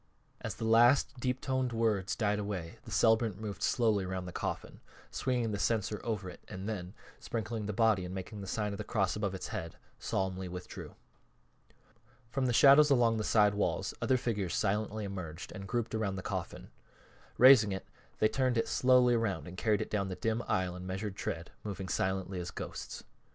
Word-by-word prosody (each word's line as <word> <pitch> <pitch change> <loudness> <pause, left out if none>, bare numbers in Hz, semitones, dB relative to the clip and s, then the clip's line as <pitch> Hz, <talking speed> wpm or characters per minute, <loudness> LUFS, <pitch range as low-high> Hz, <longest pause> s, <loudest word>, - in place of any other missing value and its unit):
As - - -4
the 115 - -4
last 120 +4 +4
deep 125 +1 -1
toned 130 -2 0
words 110 -4 +1
died 105 -2 +1
away 95 -5 -5
the - - -9
celebrant 110 -3 +3
moved 105 -2 -6
slowly 110 -6 +2
around 95 0 -4
the 90 - -6
coffin, - - -4 0.3
swinging 120 -4 -1
the 100 - -3
censer 105 -2 0
over 105 -5 -2
it 90 - -10
and 95 +2 -6
then, 95 -2 -5 0.2
sprinkling 110 -2 -4
the - - -1
body 110 -3 +3
and 90 +1 -6
making 95 +2 -6
the 100 - -7
sign 105 +1 -1
of 100 - -6
the - - -2
cross 100 -4 0
above 100 -2 -2
its 95 - -6
head, 80 -1 -5 0.2
solemnly 95 -1 -2
withdrew. 90 0 -8 1.4
From 130 0 0
the - - +2
shadows 140 +5 +7
along 120 -4 +4
the 110 - -1
side 105 -1 +4
walls 100 - -1
other 130 - +3
figures 105 -8 -2
silently 105 +1 -1
emerged 85 -5 -6
and 95 0 -8
grouped 120 0 -2
around 105 -3 -1
the 95 - -5
coffin. - - -5 0.7
Raising 125 -5 +8
it 95 0 -4 0.3
they 110 - +4
turned 130 +1 +1
it 115 - +1
slowly 125 -1 +4
around 100 - -1
and 90 - -8
carried 105 +1 +1
it - - -5
down 100 -2 0
the 95 - -4
dim 115 +3 -1
aisle 90 -1 0
in 90 0 -7
measured 95 +1 -4
tread, 85 -3 -4
moving 100 -3 -5
silently 95 0 -1
as 90 0 -4
ghosts. - - -7
105 Hz, 190 wpm, -32 LUFS, 95-115 Hz, 1.4 s, Raising